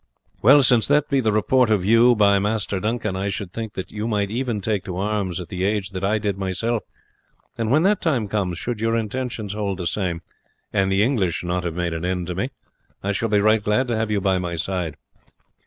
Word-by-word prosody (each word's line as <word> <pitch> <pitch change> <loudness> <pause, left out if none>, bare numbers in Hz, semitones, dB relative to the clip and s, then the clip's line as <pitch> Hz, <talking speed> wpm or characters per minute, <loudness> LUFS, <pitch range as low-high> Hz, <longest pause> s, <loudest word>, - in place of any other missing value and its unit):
Well, 135 +5 +7
since 120 -2 +4
that 145 0 +2
be 140 - +2
the 110 -3 +1
report 115 +4 +3
of 100 -4 +2
you 115 +3 +5
by 100 -2 +4
Master 105 -1 -1
Duncan, 105 -1 -2
I 95 +1 -2
should 95 -2 -5
think 110 -2 -5 0.2
you 105 +1 -4
might 105 -3 0
even 120 -2 -1
take 100 -1 -1
to 90 -3 -5
arms 100 -2 -1
at 90 - -7
the 90 -1 -3
age 100 -1 0
that 95 -1 -5
I 105 +3 +2
did 100 -2 -2
myself 105 +5 -1 0.7
and 115 -1 -2
when 150 +6 +4
that 200 +1 +2
time 130 - 0
comes, 95 -4 -2
should 120 +2 -4
your 115 0 +1
intentions 115 -2 -3
hold 100 -3 -2
the 90 - -4
same, 85 -2 -2 0.5
and 95 0 +2
the 95 +1 +3
English 105 - 0
not 90 +1 -2
have 85 -2 -3
made 85 -1 -1
an 80 0 -4
end 90 -1 -2
of 90 - -5
me, 125 +7 -1 0.5
I 100 - 0
shall 110 +3 -1
be 105 -1 +3
right 110 0 +3
glad 105 +6 +1
to 120 - +1
have 110 0 -1
you 105 -1 +1
by 95 -1 +1
my 85 -1 -3
side. 85 -2 -3
105 Hz, 225 wpm, -22 LUFS, 95-115 Hz, 0.7 s, Well